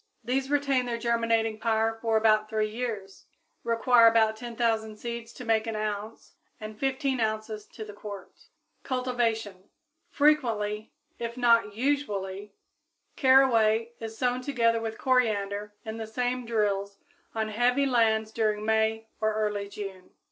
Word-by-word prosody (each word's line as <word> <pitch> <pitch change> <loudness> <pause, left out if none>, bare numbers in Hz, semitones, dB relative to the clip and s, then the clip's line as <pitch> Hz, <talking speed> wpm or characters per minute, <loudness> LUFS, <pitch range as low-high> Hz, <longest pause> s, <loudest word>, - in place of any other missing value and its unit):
These 260 +3 -1
retain 280 -3 +1
their 235 -1 -2
germinating 230 -2 0
power 225 0 0
for 225 -1 +2
about 215 -1 +3
three 215 -1 -1
years, 215 -5 -5 0.4
require 230 0 +5
about 220 -1 +4
10,000 225 -2 -2
seeds 235 0 -6
to 250 - -9
make 225 0 +1
an 225 - -3
ounce 215 +1 -5 0.3
and 215 0 -7
fifteen 270 +2 -1
ounces 215 -1 -2
to 220 - -9
the 210 - -10
quart. 200 -2 -10 0.4
Cultivation. 230 -7 -2 0.4
Frequently, 225 -8 +1 0.3
if 235 +1 -5
not 230 -4 +3
usually, 210 -7 -2 0.6
caraway 235 -4 +4
is 225 0 -7
sown 250 0 0
together 230 -4 +1
with 225 -1 -4
coriander 210 -5 0
in 220 0 -5
the 220 -1 -5
same 245 +2 -2
drills 200 -3 -1 0.4
on 220 -1 -1
heavy 245 +5 +2
lands 220 -4 +2
during 215 -2 0
May 220 0 +1
or 215 0 0
early 210 -2 -1
June. 195 -3 -8
225 Hz, 135 wpm, -27 LUFS, 215-240 Hz, 0.6 s, require